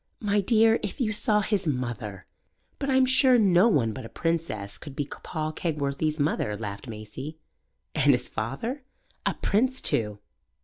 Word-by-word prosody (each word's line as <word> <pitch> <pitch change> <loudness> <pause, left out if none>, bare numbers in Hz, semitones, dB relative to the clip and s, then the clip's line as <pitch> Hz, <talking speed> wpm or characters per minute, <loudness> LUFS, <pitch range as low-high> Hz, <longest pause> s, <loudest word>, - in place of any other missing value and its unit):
"My 205 -1 +1
dear, 225 +2 +4
if 205 - -5
you 220 -4 +1
saw 210 0 +2
his 200 -3 -1
mother!" 120 -8 -3 0.5
"But 275 - -2
I'm 265 -1 +5
sure 260 0 +5
no 195 -2 +5
one 125 - +2
but 130 - -7
a 115 - -8
princess 165 -12 -2
could 145 -3 -9
be 145 - -1
Paul 155 +2 -5
Kegworthy's 155 -1 -1
mother," 125 -8 0
laughed 100 +1 -6
Maisie. 115 +8 -7 0.6
"And - - +4
his - - +1
father?" 180 - -4 0.5
"A - - +1
prince 255 +6 +1
too!" 105 -2 0
155 Hz, 160 wpm, -27 LUFS, -, 0.6 s, I'm